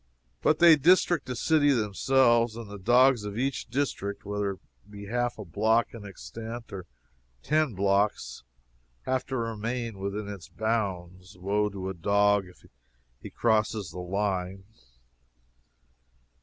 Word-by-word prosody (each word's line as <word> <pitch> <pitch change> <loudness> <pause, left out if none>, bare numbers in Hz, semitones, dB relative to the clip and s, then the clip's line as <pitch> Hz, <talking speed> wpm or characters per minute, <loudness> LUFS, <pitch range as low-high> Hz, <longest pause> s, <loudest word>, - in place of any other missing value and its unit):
But 155 - +3
they 170 -1 +8
district 170 0 +3
the 125 - -3
city 150 +3 +3
themselves, 120 0 +2
and 115 -2 -7
the 100 0 -9
dogs 120 +3 +4
of 105 0 -6
each 135 +1 -2
district, 115 -6 -3
whether 100 -1 -2
it 95 - -15 0.3
be 100 0 -9
half 120 +3 -1
a 105 - -7
block 110 +7 +1
in 110 -3 -9
extent, 115 +3 -8
or 95 -2 -7 0.6
ten 150 -5 +1
blocks, 100 - 0 0.6
have 130 -1 -1
to 135 - -3
remain 115 -1 -3
within 100 +2 -4
its 100 -4 -8
bounds. 95 -4 -3
Woe 105 +3 0
to 95 -2 -6
a 95 - -3
dog 100 +2 +2
if 90 - -18 0.6
he - - -8
crosses 110 -5 0
the 90 - -8
line! 95 0 -2
105 Hz, 140 wpm, -27 LUFS, 100-120 Hz, 0.6 s, they